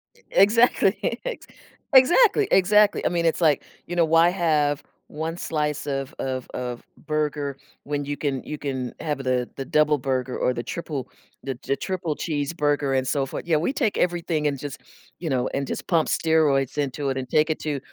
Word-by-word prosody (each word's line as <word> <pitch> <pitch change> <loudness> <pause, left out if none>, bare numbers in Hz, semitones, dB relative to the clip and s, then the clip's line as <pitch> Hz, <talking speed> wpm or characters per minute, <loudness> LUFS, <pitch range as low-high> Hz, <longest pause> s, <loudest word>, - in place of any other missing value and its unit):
E - - -24
exactly, 210 0 +3
ex - - -5 0.5
exactly, 395 - +6
exactly, 205 +2 +4
I - - +3
mean, 170 -1 0
it's 165 +2 +1
like, 150 -4 +3 0.2
you 175 - -4
know, 170 -1 +4
why 165 +2 +5
have 155 -5 +1 0.2
1 160 +2 -4
slice 150 -3 -2
of 135 +1 -3
of 130 -1 -3
of 125 -1 -5 0.2
burger 150 -2 -2 0.3
when 145 0 -3
you 145 +1 -3
can 140 -2 -2
you 150 - -5
can 130 -4 -4
have 150 -3 -2
the 130 -2 -1
the 135 - -4
double 150 +1 +3
burger 130 -1 -2
or 125 - +1
the 120 - -4
triple 150 -2 -5 0.3
the 135 - -3
j 135 +3 -2
triple 175 -2 -3
cheeseburger, 145 -3 0
and 130 - -1
so 135 0 +1
for 135 - -5
yeah, 165 -2 +2
we 170 - 0
take 240 -7 0
everything 170 -3 0
and 140 - -1
just, 145 0 -7 0.4
you 165 -3 -3
know, 130 -1 0
and 140 - -2
just - - -5
pump 165 -3 +2
steroids 150 -4 +2
into 140 0 -1
it 135 - -2
and 130 -2 -4
take 155 +1 +3
it 155 - -1
to, 145 -3 -2
150 Hz, 190 wpm, -24 LUFS, 135-165 Hz, 0.5 s, exactly